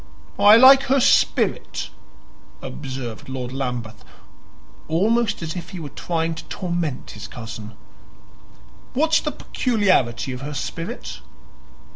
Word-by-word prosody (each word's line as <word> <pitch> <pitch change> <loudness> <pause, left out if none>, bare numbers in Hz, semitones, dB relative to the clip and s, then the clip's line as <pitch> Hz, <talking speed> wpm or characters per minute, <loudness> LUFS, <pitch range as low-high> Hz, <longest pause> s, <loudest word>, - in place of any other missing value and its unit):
"I 210 +1 +8
like 265 +2 +9
her 270 +1 +3
spirit," - - +2 0.7
observed 130 -5 -7
Lord 130 -1 -5
Lambeth, 120 -5 -4 0.8
almost 210 +5 +1
as 160 +1 -4
if 175 -3 -6
he 185 - -7
were 150 -3 -6
trying 165 +1 -2
to 165 0 -8
torment 170 -6 -3
his 105 - -8
cousin. 110 -2 -8 1.2
"What's 315 +4 +3
the 300 - -3
peculiarity 190 - +1
of 125 - -7
her 145 +1 -5
spirit?" 165 +5 -5
160 Hz, 115 wpm, -22 LUFS, 125-205 Hz, 1.2 s, like